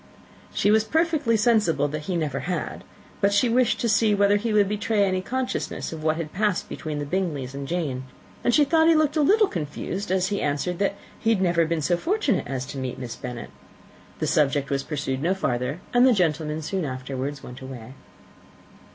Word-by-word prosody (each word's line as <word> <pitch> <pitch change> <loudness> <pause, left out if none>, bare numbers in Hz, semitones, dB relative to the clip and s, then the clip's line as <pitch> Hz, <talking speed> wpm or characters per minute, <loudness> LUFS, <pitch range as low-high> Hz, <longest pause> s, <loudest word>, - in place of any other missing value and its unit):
She 205 - +2
was 220 0 +4
perfectly 310 -4 +1
sensible 210 -10 +3
that 150 +1 -5
he 185 - 0
never 150 -5 -1
had: 180 0 -4 0.4
but 200 0 +4
she 205 +4 +3
wished 240 -1 +2
to 235 - +1
see 215 -1 +3
whether 200 0 +4
he 225 +2 -2
would 210 -2 +4
betray 210 +1 +1
any 185 -1 +1
consciousness 255 -4 -3
of 160 - -7
what 155 0 +2
had 160 -2 -5
passed 205 -1 0
between 155 -1 -5
the 145 - -3
Bingleys 145 -6 -2
and 140 0 -5
Jane; 145 -7 -2 0.4
and 240 - +3
she 295 +4 +5
thought 320 +2 +4
he 330 - +6
looked 310 -1 +2
a 310 - +3
little 420 +9 +5
confused 175 - -4
as 185 0 +1
he 200 - -1
answered 150 +5 -1
that 200 0 +1 0.2
he 225 - 0
had 225 -4 +3
never 170 -3 +2
been 165 -2 -1
so 175 +3 +2
fortunate 325 - 0
as 130 -1 -3
to 135 - -6
meet 130 -1 -4
Miss 125 -3 -6
Bennet. 125 -1 -7 0.7
The - - -1
subject 140 -2 +1
was 135 0 +1
pursued 135 -3 -3
no 180 +5 +1
further, 125 -3 -1
and 245 0 +5
the 260 -1 +6
gentlemen 155 -4 0
soon 190 +4 -2
afterwards 135 +1 -4
went 125 +1 -10
away. 130 -2 -9
180 Hz, 205 wpm, -25 LUFS, 145-215 Hz, 0.7 s, he